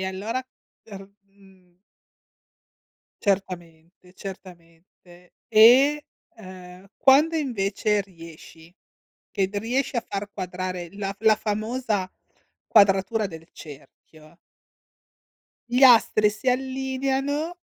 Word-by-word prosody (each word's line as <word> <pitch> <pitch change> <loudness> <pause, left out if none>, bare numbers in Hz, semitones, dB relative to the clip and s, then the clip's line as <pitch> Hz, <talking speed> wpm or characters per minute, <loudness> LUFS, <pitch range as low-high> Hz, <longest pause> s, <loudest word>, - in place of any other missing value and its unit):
E - - -3
allora 215 +7 -4 0.6
r - - -10 0.3
mhmm 190 -3 -24 1.4
certamente 180 -3 -4
certamente. 175 -1 -14 0.2
E, 255 +7 +5 0.3
ehm, 185 -3 -13
quando 295 +5 +4
invece 210 -7 -1
riesci, 165 -2 -15 0.6
che 190 -1 -1
riesci 240 +5 -2
a 235 - -3
far 200 +1 -5
quadrare, 185 -2 -5
la 200 -1 -4
f 195 - -14
la 220 -1 +4
famosa 215 -2 -3 0.6
quadratura 200 +1 +3
del 165 -2 -12
cerchio 155 +2 -15 1.4
gli 250 +2 +3
astri 225 -4 +5
si 215 +5 -2
allineano 265 +5 -2
200 Hz, 90 wpm, -24 LUFS, 180-245 Hz, 1.4 s, E